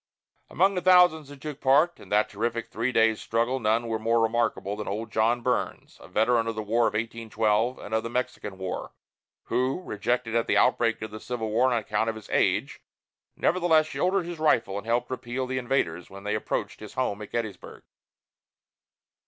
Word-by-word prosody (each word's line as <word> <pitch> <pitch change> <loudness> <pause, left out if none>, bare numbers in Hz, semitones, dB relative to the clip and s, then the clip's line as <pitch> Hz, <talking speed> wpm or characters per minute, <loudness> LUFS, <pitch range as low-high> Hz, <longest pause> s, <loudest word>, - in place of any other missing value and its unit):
Among 190 +4 +3
the 180 - -1
thousands 180 -5 +5
who 145 - -9
took 145 +1 -8
part 150 +6 +3
in - - -14
that 105 +1 +3
terrific 115 +2 -3
three 120 +3 -1
days' 110 -2 +3
struggle 120 +4 0
none 115 +1 +1
was 110 -1 -2
more 115 +1 +2
remarkable 115 -3 0
than 105 0 -6
old 110 +3 -4
John 115 +2 +2
Burns, - - -2
a - - -12
veteran 115 +5 +2
of 115 - -2
the 110 - -3
War 115 +3 +2
of 105 - -3
1812 115 +1 0
and 105 - -8
of 110 - +2
the 115 - -5
Mexican 120 -5 -3
War, 95 -1 -5 0.5
who, 130 +5 0
rejected 115 - -2
at 115 - +1
the - - +2
outbreak 115 -3 +2
of 110 - -6
the 110 - -7
Civil 110 -2 -4
War 125 +4 +3
on 120 - +2
account 110 0 -1
of 110 - -3
his 110 - -11
age, - - +1 0.5
nevertheless 170 -3 +3
shouldered 185 +3 0
his 170 -2 -6
rifle 115 -10 +2
and 105 - -12
helped 120 +2 0
repel 130 +1 -3
the 130 0 -2
invaders, 105 -10 -1
when 100 0 -11
they 105 +1 -2
approached 105 - -3
his 105 -1 -10
home 110 -5 -1
at 105 - -9
Gettysburg. 110 -6 -5
115 Hz, 195 wpm, -26 LUFS, 110-130 Hz, 0.5 s, thousands